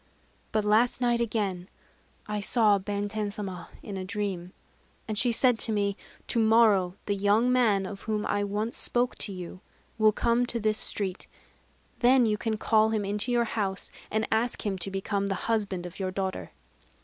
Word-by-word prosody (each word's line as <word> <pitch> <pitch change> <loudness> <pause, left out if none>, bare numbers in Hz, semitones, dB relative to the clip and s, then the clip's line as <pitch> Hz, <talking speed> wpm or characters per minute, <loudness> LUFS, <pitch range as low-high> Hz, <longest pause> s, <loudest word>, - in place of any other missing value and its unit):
But 215 -1 0
last 220 +4 +3
night 240 -1 +2
again 200 -5 -2 0.6
I 210 0 -3
saw 210 -1 +3
Benten 205 +1 -2
Sama 190 -4 -6
in 200 -2 -6
a 190 - -4
dream; 185 -2 -3 0.6
and 215 - -2
she 240 +4 +2
said 245 0 +3
to 225 - +2
me: 200 -2 0 0.3
'To 235 - 0
morrow 220 -5 +4
the 205 - 0
young 205 +5 +3
man, 215 -6 +3
of 195 +1 -7
whom 210 -1 0
I 205 - 0
once 210 +3 -2
spoke 245 0 +1
to 205 - -5
you, 185 0 -8 0.4
will 215 0 +6
come 235 +3 +1
to 235 - -2
this 215 0 +1
street: 195 -2 -4 0.7
then 250 0 +5
you 215 -1 +2
can 220 -1 -1
call 220 0 +3
him 215 -2 -1
into 210 +5 -1
your 240 -1 +3
house, 200 -4 -3 0.2
and 220 +1 0
ask 225 +1 0
him 200 -2 0
to 175 - -4
become 195 +1 -2
the 195 - -1
husband 200 -5 -1
of 180 +2 -9
your 190 -1 -1
daughter. 185 - -3
210 Hz, 180 wpm, -28 LUFS, 195-225 Hz, 0.7 s, will